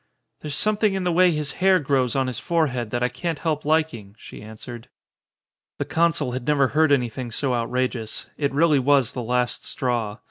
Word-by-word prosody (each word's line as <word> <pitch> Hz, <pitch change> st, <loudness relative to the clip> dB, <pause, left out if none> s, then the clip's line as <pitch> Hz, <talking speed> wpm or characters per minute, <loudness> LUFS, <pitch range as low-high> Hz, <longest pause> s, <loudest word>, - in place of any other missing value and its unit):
"There's 150 Hz, -2 st, -5 dB
something 215 Hz, +1 st, +1 dB
in 190 Hz, -, -2 dB
the 180 Hz, -, +1 dB
way 180 Hz, +2 st, +5 dB
his 150 Hz, -3 st, -2 dB
hair 190 Hz, 0 st, +5 dB
grows 135 Hz, -5 st, 0 dB
on 135 Hz, -1 st, +1 dB
his 125 Hz, -2 st, -3 dB
forehead 130 Hz, -7 st, 0 dB
that 120 Hz, +2 st, -2 dB
I -, -, +3 dB
can't 140 Hz, +7 st, -4 dB
help 155 Hz, -1 st, -2 dB
liking," 150 Hz, -10 st, -1 dB
she -, -, -11 dB
an 110 Hz, +1 st, -11 dB
swered. 120 Hz, 0 st, -9 dB, 0.9 s
The -, -, -2 dB
consul 165 Hz, -5 st, +1 dB
had 125 Hz, 0 st, -5 dB
never 140 Hz, -3 st, +3 dB
heard 155 Hz, -1 st, +3 dB
anything 125 Hz, -2 st, 0 dB
so 130 Hz, +3 st, 0 dB
out 115 Hz, -1 st, -1 dB
rageous. 125 Hz, -3 st, -2 dB
It 140 Hz, -2 st, -1 dB
really 150 Hz, 0 st, +3 dB
was 135 Hz, -2 st, +3 dB
the 125 Hz, -, -5 dB
last 125 Hz, +1 st, -1 dB
straw. 115 Hz, -5 st, -2 dB
135 Hz, 200 wpm, -23 LUFS, 120-155 Hz, 0.9 s, way